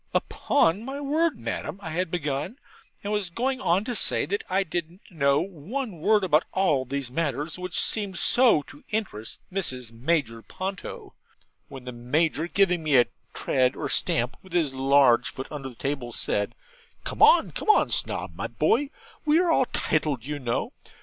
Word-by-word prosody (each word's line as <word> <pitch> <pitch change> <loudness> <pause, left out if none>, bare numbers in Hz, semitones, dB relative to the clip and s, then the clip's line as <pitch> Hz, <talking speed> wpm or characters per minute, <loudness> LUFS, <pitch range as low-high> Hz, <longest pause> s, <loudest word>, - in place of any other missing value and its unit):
'Upon 200 - +1
my 270 +3 -5
word, 300 0 +1
Madam,' 155 +5 -4
I 165 -5 -7
had 175 +1 -1
begun, 150 - -3 0.5
and 205 +1 -2
was 205 -4 -1
going 255 +8 -2
on 185 -2 +2
to 245 - -3
say 220 - +1
that 200 +7 -2
I 190 +1 +2
didn't 175 +1 -5
know 140 -3 +2
one 195 - -5
word 210 +5 +3
about 160 -3 +3
all 150 -9 +2
these 135 -1 -4
matters 150 +2 -2
which 180 -1 -2
seemed 200 -4 +2
so 235 - +4
to 145 - -15
interest 190 - -3 0.2
Mrs. 130 - -3
Major 120 -2 -1
Ponto, 190 - -6 0.5
when 130 -2 -10
the 125 - -5
Major, 150 +7 0
giving 180 -2 +2
me 150 -3 +4
a 120 - +6 0.3
tread 130 -1 +1
or - - -4
stamp 120 +3 +1
with 190 -2 -15
his 160 -6 +1
large 135 -2 +4
foot 130 - -6
under 140 -3 -5
the 125 - -14
table, 135 -2 -3
said - - -1 0.5
'Come, 460 +3 +5
come, 430 - +2
Snob - - -2
my - - -3
boy, 280 +4 +1 0.3
we 305 +1 +3
are 350 -1 +3
all 265 - +4
tiled, 150 -6 -1
you 145 0 -4
know. 120 -3 -2
165 Hz, 170 wpm, -26 LUFS, 140-205 Hz, 0.5 s, a